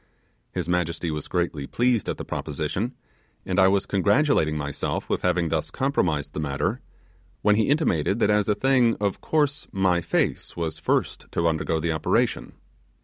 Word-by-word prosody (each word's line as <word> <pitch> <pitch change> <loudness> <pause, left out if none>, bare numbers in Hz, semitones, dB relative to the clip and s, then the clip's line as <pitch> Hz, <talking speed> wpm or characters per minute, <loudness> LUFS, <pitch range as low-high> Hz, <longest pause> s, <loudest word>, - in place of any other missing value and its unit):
His 90 -3 -3
majesty 85 -1 -1
was 75 -1 -4
greatly 85 -6 -2
pleased 120 -3 +1
at - - -2
the - - -6
proposition, 80 - -3 0.5
and 95 +1 0
I 95 - +7
was 100 0 +2
congratulating 100 - +2
myself 75 -1 -3
with - - -1
having 90 -2 +1
thus 80 -1 -1
compromised 90 - 0
the - - -4
matter, 75 - -1 0.6
when 105 0 +5
he 110 +2 +2
intimated 105 - +2
that 105 -3 +3
as 105 0 +2
a 105 - +3
thing 125 0 +3
of 100 -2 -1
course 145 -2 0
my 90 -2 +2
face 85 - -1
was 80 -2 -3
first - - -1
to 85 - +1
undergo 80 0 0
the 85 +1 -1
operation. 80 -1 0
90 Hz, 165 wpm, -25 LUFS, 80-110 Hz, 0.6 s, I